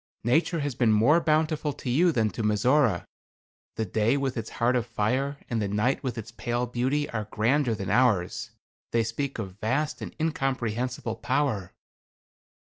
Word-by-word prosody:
Nature 160 +7 +2
has 145 -1 -2
been 115 -2 +2
more 120 +11 +5
bountiful 155 -1 +1
to - - -10
you 165 +8 +4
than 110 -7 +1
to - - -4
Mizora. 110 0 +2 0.7
The 110 - -1
day 110 +7 +1
with 135 -2 -1
its 115 -1 -4
heart 120 +2 +2
of 120 -2 0
fire, 125 +6 -1
and 115 -2 -1
the 100 - 0
night 105 +6 +1
with 125 -3 -3
its 115 0 -6
pale 120 +1 -2
beauty 130 +5 0
are 110 -2 -3
grander 120 +3 +1
than 95 -3 -4
ours. 110 -1 +2 0.4
They 115 -1 +3
speak 130 +5 -3
of 100 -3 -6
vast 135 +8 -1
and - - -7
incomprehensible 125 -6 -1
power." 110 -13 -1
120 Hz, 165 wpm, -27 LUFS, 110-140 Hz, 0.7 s, more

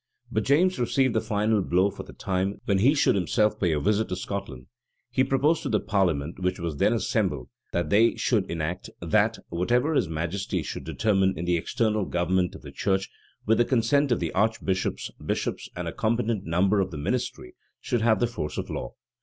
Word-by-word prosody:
But 110 0 0
James 165 +3 +3
reserved 130 +1 +2
the 110 - +1
final 110 -1 +1
blow 95 +2 +2
for - - -8
the - - -11
time 95 +1 -2
when 100 -2 +2
he 135 +9 +4
should 145 - +4
himself 105 +3 +1
pay 90 -4 +2
a 75 - +1
visit 105 +6 +1
to 90 - -2
Scotland. 90 -9 -5 0.5
He 130 - +3
proposed 145 +5 +2
to - - -3
the 105 - +2
parliament, 85 -8 0
which 90 0 -1
was 85 -4 -3
then 105 - +3
assembled, 95 - -1 0.2
that 85 -3 -1
they 115 +3 +5
should 105 -6 0
enact, 85 +2 -3
that - - +2
"whatever 120 - +1
his 95 - +1
majesty 85 +3 -2
should - - -6
determine 95 -4 +1
in 85 - -3
the 90 0 +2
external 105 +4 0
government 90 +1 0
of - - -12
the - - -9
church, 95 -1 -1 0.3
with 110 +2 +3
the - - +6
consent 130 +3 +2
of 120 - +2
the - - -2
archbishops, 100 -3 -1
bishops, - - -2
and - - -4
a - - -4
competent 115 -2 0
number 95 +5 +2
of 95 -1 0
the 80 - -7
ministry, 70 -3 -3 0.3
should 120 - -1
have 110 -1 +3
the 120 - +3
force 85 -11 -4
of - - -4
law." - - -5
100 Hz, 200 wpm, -26 LUFS, 90-115 Hz, 0.5 s, the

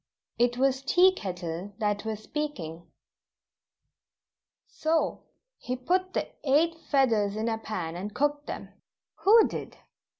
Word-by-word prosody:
It 245 0 +3
was 265 0 +2
Tea 355 +7 +5
Kettle 180 - -5
that 210 -2 -1
was 215 -1 -4
speaking: 170 - -5 1.8
"So, 320 +1 -1 0.3
he 250 - -3
put 365 +9 0
the - - 0 0.2
eight 305 +4 +3 0.2
feathers 225 -8 +3
in 220 +1 -1
a 225 -1 -1
pan, 180 -7 -4
and 195 +4 -5
cooked 290 +5 0
them - - -6 0.3
" - - -65
"Who 440 +3 +8
did?" - - -7
245 Hz, 130 wpm, -28 LUFS, 205-295 Hz, 1.8 s, Who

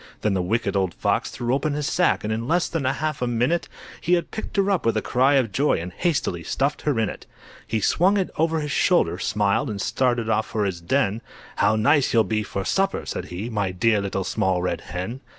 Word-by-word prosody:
Then 105 - +1
the 95 - +1
Wicked 100 +2 -1
Old 95 -3 0
Fox - - 0
threw 120 +1 -2
open 140 +2 0
his 150 -1 -2
sack, 180 +4 +2
And 110 +1 -1
in 115 +2 -3
less 175 +3 +2
than 160 -5 -3
half 150 +2 -1
a 125 - 0
minute, 125 +8 0 0.3
He 175 - +1
had 175 -1 +1
picked 220 - -6
her 200 0 +3
up 190 - +1
with 115 -1 +1
a - - +1
cry 130 +3 +3
of 125 -6 +2
joy, 145 +8 +2
And 90 +2 -6
hastily 145 - -1
stuffed 135 - -1
her 145 -6 0
in 110 - +2
it. - - -8 0.4
He 110 -1 -1
swung 185 - +3
it 190 - -1
over 160 0 +1
his 150 -1 -4
shoulder, - - +2
smiled, 105 +5 +1
And 105 -2 -4
started 120 +1 0
off 110 -1 +1
for 110 -3 -1
his 90 -3 -3
den; 110 +2 0 0.4
"How 110 - +3
nice 130 +5 +3
you'll 115 - +6
be 110 -1 -1
for 100 -2 -4
supper!" 195 0 0
said - - -4
he, 90 +6 -5
"My 100 -3 0
dear 105 +3 +2
Little 95 -1 -2
Small 90 -1 0
Red 90 - -2
Hen!" 95 - -5
115 Hz, 230 wpm, -23 LUFS, 100-150 Hz, 0.4 s, you'll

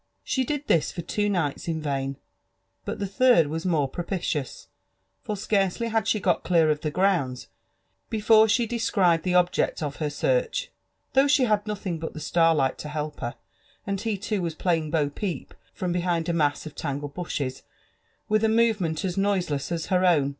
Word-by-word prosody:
She 260 - 0
did 295 +2 -3
this 160 - +2
for 170 - -6
two 205 +4 -1
nights 170 -8 -1
in 160 -1 -1
vain, 135 -2 -2 0.7
but - - -3
the 200 - -2
third 200 -3 +4
was 160 +4 -3
more 155 -6 +2
propitious; 170 -3 -3 0.5
for 210 - -4
scarcely 200 +2 0
had 225 -1 0
she 215 - +2
got 180 -3 +1
clear 165 -3 +3
of 150 0 -2
the 155 - -1
grounds, 165 -8 0 0.6
before 220 0 +5
she 235 +3 +3
descried 200 -7 +2
the 180 +1 0
object 180 -2 +2
of 145 -1 -4
her 150 -2 -1
search, - - 0 0.4
though 270 +2 +5
she 280 -2 +4
had 210 -3 +1
nothing 190 -5 -3
but 160 - -5
the - - -5
starlight 160 -5 +2
to 150 - -6
help 150 0 -4
her, 120 - -4 0.5
and 200 -1 -2
ho 225 -1 -1
too 200 +1 -2
was 165 -2 -3
playing 165 -3 0
bo 150 -2 +1
peep, 165 +1 -5 0.2
from 180 -1 -3
behind 175 -2 0
a 170 - 0
mass 145 -3 +1
of 155 - -8
tangled 145 -1 -4
bushes, 140 -7 -4 0.7
with 215 +1 +2
a 220 - +4
movement 215 -8 +1
as 180 -1 -3
noiseless 180 -9 0
as 165 -2 -2
her 185 -1 +1
own. 155 -7 +4
175 Hz, 185 wpm, -26 LUFS, 155-210 Hz, 0.7 s, before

